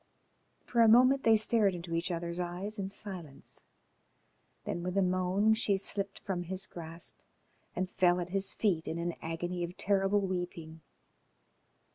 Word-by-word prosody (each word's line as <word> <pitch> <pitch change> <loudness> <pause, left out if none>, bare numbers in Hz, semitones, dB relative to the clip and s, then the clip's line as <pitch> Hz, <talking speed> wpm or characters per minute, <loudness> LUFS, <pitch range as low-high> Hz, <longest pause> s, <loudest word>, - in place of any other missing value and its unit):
For 235 - +2
a 230 - +7
moment 255 +4 +6
they 225 -3 +5
stared 215 -3 +3
into 170 -1 -6
each 170 +2 -1
other's 170 0 -3
eyes 180 +5 -3
in 190 -1 -2
silence, 185 -8 -5 1.0
then, 175 - -3
with 180 +2 -3
a - - +5
moan, 185 +4 +2
she 220 -3 +2
slipped 195 0 -1
from 185 -3 -3
his 190 +2 -3
grasp 165 0 -8 0.6
and 185 +1 -1
fell 180 -1 +3
at 175 0 -4
his 195 +1 0
feet 180 -7 0
in 165 - -2
an 170 0 -2
agony 175 +2 -3
of 175 +2 -6
terrible 200 0 +2
weeping. 175 -4 -4
185 Hz, 155 wpm, -31 LUFS, 175-200 Hz, 1.0 s, a